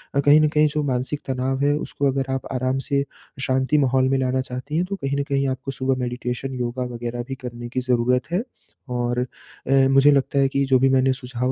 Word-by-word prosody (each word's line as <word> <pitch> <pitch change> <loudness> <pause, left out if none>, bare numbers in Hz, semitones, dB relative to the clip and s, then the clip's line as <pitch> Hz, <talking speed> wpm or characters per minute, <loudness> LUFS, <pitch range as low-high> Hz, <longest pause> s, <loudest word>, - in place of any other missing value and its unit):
अ, - - +3
कहीं 145 +2 +6
न 155 - +4
कहीं 150 0 +3
जो 150 - +1
मानसिक 130 +2 -2
तनाव 130 +1 -1
है 145 - +3
उसको 145 -1 -2
अगर 135 0 -2
आप 135 - -3
आराम 130 +1 0
से, 140 -1 +2 0.4
शांति 130 +2 +1
माहौल 130 -1 +2
में 135 - +2
लाना 130 0 +1
चाहती 130 +4 -5
हैं, 175 - +1
तो 200 +2 -4
कहीं 140 -6 -2
न - - +1
कहीं 140 0 +1
आपको 130 +1 -4
सुबह 135 0 0
मैडिटेशन, 125 +1 -3
योगा 125 +1 -2
वगैरह 120 +1 -4
भी 135 - -4
करने 120 0 -6
की 130 - -2
जरूरत 125 +3 +1
है 185 +6 0 0.5
और 120 0 0 0.5
अ, 135 0 +4
मुझे 135 +2 +6
लगता 140 0 +2
है 135 - +4
कि 140 +1 0
जो 130 -1 +3
भी 135 +1 +4
मैंने 130 0 +3
सुझाव 125 0 -3
130 Hz, 225 wpm, -23 LUFS, 125-140 Hz, 0.5 s, कहीं